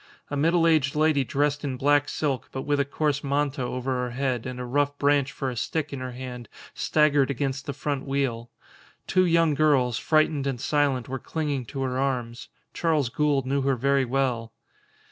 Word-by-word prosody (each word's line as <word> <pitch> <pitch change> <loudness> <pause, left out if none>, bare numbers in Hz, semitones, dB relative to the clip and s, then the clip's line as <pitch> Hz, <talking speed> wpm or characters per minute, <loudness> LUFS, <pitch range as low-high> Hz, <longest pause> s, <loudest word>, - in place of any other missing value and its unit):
A - - -1
middle 165 +4 +3
aged 155 -4 +3
lady 155 -2 +3
dressed 145 +3 0
in 135 -3 -3
black 145 +2 +3
silk, 140 -4 -2
but 130 - -4
with 145 -1 0
a 140 - +2
coarse 145 0 -1
manta 140 -1 0
over 125 +1 -3
her 125 - -2
head 130 -1 -2
and 125 -1 -6
a 125 - -4
rough 145 +3 0
branch 145 -1 +2
for 135 -1 -3
a - - -7
stick 145 +5 -2
in 135 - -4
her 130 -1 -5
hand, 125 -2 -7 0.2
staggered 145 -3 +2
against 135 0 -2
the - - -1
front 140 0 -3
wheel. 130 -4 -1 0.6
Two 185 0 +3
young 165 -2 +3
girls, 135 -5 +2
frightened 155 -3 +2
and 130 -3 -2
silent, 140 -3 +1
were 130 +1 -4
clinging 145 -5 -3
to 135 +4 -4
her 130 0 -2
arms. 125 -4 -2 0.3
Charles 155 -7 +1
Gould 145 0 +1
knew 140 +1 0
her 135 0 +1
very 140 +2 +2
well. 120 -3 -1
140 Hz, 190 wpm, -26 LUFS, 130-145 Hz, 0.6 s, middle